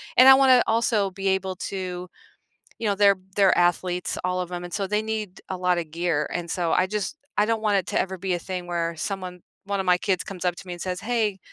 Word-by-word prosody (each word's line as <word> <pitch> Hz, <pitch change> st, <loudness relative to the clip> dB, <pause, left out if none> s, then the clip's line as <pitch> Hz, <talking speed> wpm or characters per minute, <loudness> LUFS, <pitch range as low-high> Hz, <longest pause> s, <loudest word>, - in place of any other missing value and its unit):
and 255 Hz, +1 st, +8 dB
I -, -, +12 dB
wanna 260 Hz, -2 st, +6 dB
also 220 Hz, -3 st, +1 dB
be 195 Hz, +1 st, -4 dB
able 190 Hz, 0 st, -1 dB, 0.2 s
to, 180 Hz, -1 st, -4 dB, 0.7 s
you 230 Hz, -, -3 dB
know, 200 Hz, -, +2 dB
they're 200 Hz, 0 st, +5 dB, 0.2 s
they're 195 Hz, -2 st, +4 dB
athletes, 175 Hz, 0 st, +1 dB
all 180 Hz, 0 st, 0 dB
of 180 Hz, 0 st, -8 dB
'em, 175 Hz, 0 st, -4 dB
and 175 Hz, -, -8 dB
so 200 Hz, -1 st, -1 dB
they 210 Hz, +2 st, 0 dB
need 220 Hz, -3 st, -4 dB
a 190 Hz, -, -3 dB
lot 180 Hz, -1 st, +1 dB
of 165 Hz, -2 st, -4 dB
gear, 165 Hz, -2 st, -1 dB
and 170 Hz, -1 st, -4 dB
so 170 Hz, -2 st, 0 dB
I 185 Hz, -, +3 dB
just 210 Hz, +7 st, -3 dB, 0.2 s
I 210 Hz, -, +4 dB
don't 225 Hz, -1 st, 0 dB
want 210 Hz, -2 st, +2 dB
it 185 Hz, -, -3 dB
to -, -, +1 dB
ever 190 Hz, 0 st, -3 dB
be 185 Hz, 0 st, -1 dB
a -, -, -1 dB
thing 180 Hz, 0 st, -5 dB
where 170 Hz, -1 st, -2 dB
someone 185 Hz, 0 st, -5 dB, 0.2 s
one 200 Hz, 0 st, -2 dB
of 190 Hz, -, -3 dB
my 180 Hz, -, +3 dB
kids 185 Hz, -1 st, 0 dB
comes 185 Hz, -2 st, -7 dB
up 180 Hz, -1 st, +1 dB
to -, -, -10 dB
me 180 Hz, -, -5 dB
and 175 Hz, -, -11 dB
says, 180 Hz, -1 st, -3 dB
"Hey, 220 Hz, -4 st, 0 dB
185 Hz, 255 wpm, -25 LUFS, 180-205 Hz, 0.7 s, I